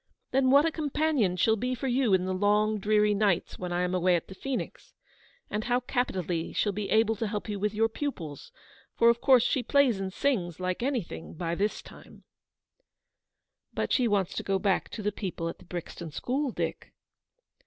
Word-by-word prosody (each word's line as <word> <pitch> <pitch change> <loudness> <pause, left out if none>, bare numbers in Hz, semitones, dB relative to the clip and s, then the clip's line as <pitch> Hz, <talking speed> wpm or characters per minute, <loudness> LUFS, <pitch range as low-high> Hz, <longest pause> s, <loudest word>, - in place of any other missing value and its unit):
Then 260 0 +3
what 280 +3 +6
a 330 - +1
companion 295 - 0
she'll 220 +5 +3
be 250 +4 -2
for 265 +3 -4
you 250 -2 +2
in 185 -1 0
the 185 - -1
long 210 +2 +2
dreary 210 +1 +3
nights 200 -4 0
when 180 -1 -4
I 175 +1 0
am 180 0 -1
away 180 0 +3
at 170 - -3
the - - -7
Phoenix, 265 +6 -5 0.5
and 210 +2 -3
how 245 0 +2
capitally 185 -10 -2
she'll 205 - +1
be 200 0 -4
able 225 0 +3
to 225 - -1
help 210 +1 -4
you 205 -2 -3
with 210 +1 -1
your 225 +1 +3
pupils; 220 - -5 0.5
for, 235 - +6
of 235 - -4
course, 255 -4 +6
she 265 - +1
plays 255 -4 +3
and 190 -1 -3
sings, 185 - -1
like 185 +2 -2
anything, 240 - -3
by 170 0 -2
this 205 +4 -1
time/ - - -15 0.8
' - - -57
"But - - -1
she 250 -3 +3
wants 200 -4 +1
to - - 0
go 195 -1 0
back 190 -1 0
to 215 - -7
the 210 - +1
people 185 -5 -4
at - - -8
the - - -16
Brixton 175 -1 -6
school, 265 - -2
Dick." - - -4
210 Hz, 200 wpm, -28 LUFS, 185-245 Hz, 0.8 s, what